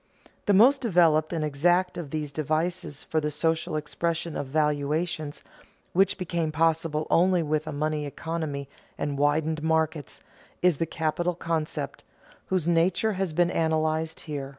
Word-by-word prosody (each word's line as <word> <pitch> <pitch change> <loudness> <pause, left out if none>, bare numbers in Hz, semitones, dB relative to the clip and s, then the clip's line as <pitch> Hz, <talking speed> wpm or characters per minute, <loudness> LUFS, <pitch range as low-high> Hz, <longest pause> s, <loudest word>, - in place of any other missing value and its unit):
The 205 - +5
most 260 +8 +6
developed 165 - +3
and 160 -3 -1
exact 175 +5 +2
of 170 -5 -5
these 150 -1 -3
devices 155 +1 -2
for 155 - -1
the 150 - -1
social 160 +1 -1
expression 165 +2 -2
of 140 - -3
valuations, 150 +1 -1 0.5
which 195 +2 +3
became 170 -3 -2
possible 160 -1 +1
only 180 0 +4
with 155 0 -1
a - - -3
money 150 0 -1
economy 150 -2 -4 0.3
and 145 -1 -2
widened 150 +2 +1
markets, 160 -2 -1 0.4
is 180 -5 +4
the 165 - -1
capital 165 +3 -1
concept, 165 -2 -3 0.4
whose 185 -4 0
nature 175 +6 +2
has 190 -2 -2
been 175 +2 +2
analyzed 160 0 0
here. 145 -3 -5
160 Hz, 145 wpm, -26 LUFS, 150-170 Hz, 0.5 s, most